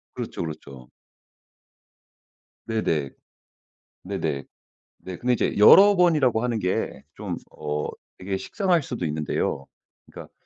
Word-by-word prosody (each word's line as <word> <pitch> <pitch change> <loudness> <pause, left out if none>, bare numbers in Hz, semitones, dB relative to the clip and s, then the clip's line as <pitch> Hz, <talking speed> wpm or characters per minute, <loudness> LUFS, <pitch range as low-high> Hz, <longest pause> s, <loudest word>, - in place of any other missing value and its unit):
그렇죠, - - -5
그렇죠. 70 -6 -8 1.8
네네, 80 -11 -1 0.9
네네. 70 -1 -3 0.6
네. 90 -1 -8
근데 125 0 +1
이제 115 - -1
여러 200 - +8
번이라고 150 -10 +3
하는 120 -3 -1
게 90 -1 -2
좀 - - -4 0.2
어 75 0 -3 0.3
이게 95 +1 -3
식상할 180 - 0
수도 120 -10 -4
있는데요. 75 -2 -2 0.4
그러니까 - - -12
95 Hz, 235 characters per minute, -24 LUFS, 75-125 Hz, 1.8 s, 여러